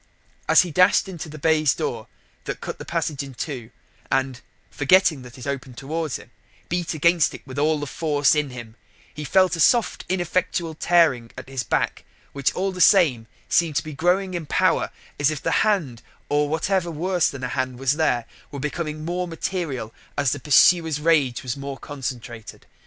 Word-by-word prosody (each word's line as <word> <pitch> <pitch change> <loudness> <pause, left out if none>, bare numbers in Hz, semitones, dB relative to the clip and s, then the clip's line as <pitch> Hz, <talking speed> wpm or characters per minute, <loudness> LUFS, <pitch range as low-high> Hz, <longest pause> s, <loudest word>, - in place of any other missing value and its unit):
As - - +7
he 175 - -6
dashed 185 +4 +4
into 170 -4 -7
the 155 - -9
baize 155 -2 +2
door 115 -2 -4 0.4
that - - -4
cut - - -6
the - - -7
passage 150 -3 -2
in 135 -2 -9
two, 120 -2 -5 0.4
and 135 -1 0 0.3
forgetting 155 -1 +3
that 125 0 -12
it 125 - -9
opened 135 -3 -5
towards 155 +2 -3
him - - -9 0.4
beat 175 -1 -2
against 170 +1 +3
it - - -13
with 135 +1 -6
all 155 +1 +2
the 145 - -3
force 145 -2 +1
in 150 -2 0
him, 120 -3 -9 0.4
he 150 - -6
felt 185 +5 +3
a - - -7
soft 235 +8 +3
ineffectual 175 -2 -1
tearing 155 -8 +2
at 130 - -8
his 135 -1 -3
back - - -1 0.3
which, 140 -1 +1
all 195 +1 0
the 180 -1 -4
same, 150 - +5 0.2
seemed 165 -4 +2
to 145 - +1
be 155 - -7
growing 180 +5 +1
in 170 -4 -4
power, - - +2 0.3
as 145 0 +3
if 155 -2 -3
the - - -2
hand, 165 - 0 0.3
or 145 0 +1
whatever 175 +3 0
worse 175 +2 +1
than 140 -2 -8
a 125 - -2
hand 130 -1 -2
was 135 +1 +1
there, 140 -6 +1 0.2
were 140 - -7
becoming 155 +1 -4
more 180 +1 -2
material 160 - -4 0.2
as 140 -3 +2
the 145 - -2
pursuer's 160 +3 +4
rage 150 -6 +2
was 125 -2 -3
more 140 -1 -6
concentrated. 125 -5 -7
150 Hz, 185 wpm, -23 LUFS, 130-170 Hz, 0.4 s, As